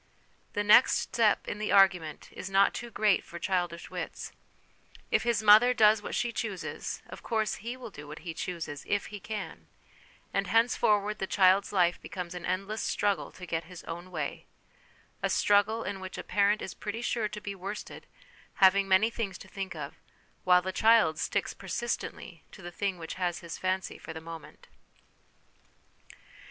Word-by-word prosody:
The 205 - 0
next 210 +5 +6
step 220 -3 +1
in 205 - -4
the 215 - -2
argument 180 -6 +3
is 185 - -7
not 195 +1 +4
too 240 - -6
great 210 -3 +2
for 170 - -9
childish 175 -2 -2
wits: - - -5 0.8
if - - +3
his 235 -3 0
mother 220 +4 +7
does 215 -1 +5
what - - -5
she 240 - 0
chooses, 210 -6 -4
of - - -10
course 220 -2 -1
he 235 +4 -5
will 240 -4 -9
do 145 -3 -10
what 150 +1 -8
he 165 - -4
chooses, 160 -4 -5
if 205 0 0
he 205 - -5
can; 210 -1 -6 0.7
and - - 0
henceforward 215 -2 +2
the 190 - -2
child's 190 0 +4
life 180 -3 +2
becomes 180 -2 -6
an 180 -1 -6
endless 195 +4 -2
struggle 205 -1 0
to 180 - -9
get 165 -1 -3
his 180 0 -11
own 175 +2 -7
way; 155 -5 -5 0.7
a - - 0
struggle 205 +2 +3
in 200 -1 -4
which 190 0 -7
a - - -5
parent 205 +1 +2
is 185 - -6
pretty 225 +3 -5
sure 230 -3 0
to 210 0 -7
be 200 -1 -5
worsted, 195 +2 -7 0.5
having 195 0 +5
many 195 +4 +4
things 205 -6 -4
to 190 - -13
think 190 -2 -6
of, 150 -3 -7 0.5
while 180 -1 +5
the 190 - -2
child 220 -9 +4
sticks - - -1
persistently 230 -7 -5
to 195 - -13
the 175 - -7
thing 195 +1 -2
which 165 -1 -6
has 175 0 -1
his 170 -2 -7
fancy 185 0 -2
for 160 - -8
the 160 - -6
moment. 165 0 -11
195 Hz, 175 wpm, -29 LUFS, 180-215 Hz, 0.8 s, mother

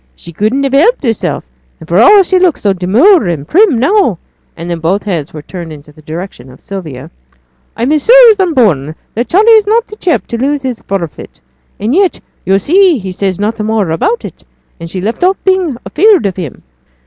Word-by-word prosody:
'She 170 - -12
couldn't 220 - -1
help 370 - +3
hersel'; 225 -5 -2 0.4
and 160 - -13
for 170 +4 +1
all 400 - +6
she 370 +1 +1
looks 360 -4 +1
so 200 -2 +1
demure 220 - +3
and 155 -4 -4
prim 365 - +3
now' 270 - +1 0.4
(and 170 +1 -6
then 170 - -3
both 180 +5 -1
heads 170 -8 -4
were 150 -2 -9
turned 170 -1 -8
in 150 -2 -11
the 150 +1 -18
direction 155 -4 -8
of 130 - -16
Sylvia), 160 -10 -8 0.7
'I'm 240 +5 -1
as 305 -2 0
sure - - +7
as 420 - -2
I'm 360 -4 0
born 155 - +1 0.2
that 235 +3 -2
Charley 425 +6 +3
is 435 -2 +4
not 455 +2 +1
t' 425 - -10
chap 350 -6 -1
to 235 - -4
lose 285 +1 -1
his 255 -3 -4
forfeit; 180 -5 -6 0.4
and 220 +5 -2
yet 380 +1 +1 0.3
yo' 195 +1 +3
see 350 - +3
he 190 -4 -6
says 185 0 -2
nought 220 +2 -2
more 210 -5 -1
about 435 - -1
it, - - -10 0.4
and 165 0 -8
she's 185 +1 -5
left 225 - -3
off 375 +1 +2
being 375 -8 0 0.2
'feared 390 - +3
of 190 -2 -2
him.' 170 -8 -7
225 Hz, 205 wpm, -11 LUFS, -, 0.7 s, sure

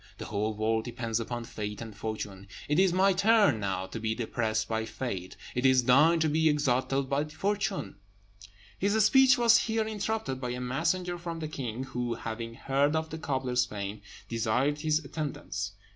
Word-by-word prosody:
The - - -6
whole 105 +1 -2
world 110 +1 0
depends 115 -2 -2
upon 120 +1 -4
fate 105 -2 -5
and 110 -3 -8
fortune. 100 -2 -5 0.2
It 150 +3 +2
is 190 -1 +5
my 190 +2 +4
turn 205 - +4
now 95 -2 -2
to 115 - -7
be 110 0 -1
depressed 110 -2 -1
by 110 0 -1
fate; 95 -6 -5 0.2
it 125 - -1
is 130 -1 +5
thine 150 +7 +5
to 160 - +3
be 160 +1 +3
exalted 135 -1 +1
by 140 +2 0
fortune." 195 - -2 0.8
His 205 +2 +3
speech 265 +2 +6
was 235 -1 +6
here 225 -1 0
interrupted 215 -9 -3
by 125 - -2
a 125 - -4
messenger 165 +8 -1
from 170 -1 -5
the 160 -1 -4
king, 130 -5 -4
who, 125 -3 -3
having 115 +1 -5
heard 140 +4 +1
of 160 0 -2
the 160 - -5
cobbler's 130 -4 0
fame, 100 0 -5 0.3
desired 120 +6 0
his 155 -1 0
attendance. 130 - -4
130 Hz, 175 wpm, -29 LUFS, 110-160 Hz, 0.8 s, speech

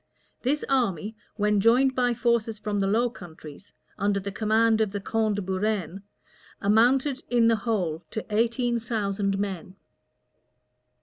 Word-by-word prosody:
This 285 +4 0
army, 220 - 0 0.2
when 210 -1 +1
joined 255 +5 +4
by 245 -2 +1
forces 235 -2 0
from 210 -1 -3
the 195 - +1
Low 230 +5 +2
Countries, 175 -6 -12 0.3
under 200 0 +1
the 200 +1 -5
command 220 +2 +2
of 215 - +1
the 205 - -2
count 215 +1 0
de 205 - -3
Buren, 190 0 -2 0.6
amounted 250 +7 +2
in 235 -2 +4
the 225 - +3
whole 185 -8 -2
to 220 - -5
eighteen 235 +1 +1
thousand 200 -4 -2
men. 195 -2 -4
215 Hz, 140 wpm, -26 LUFS, 200-235 Hz, 0.6 s, joined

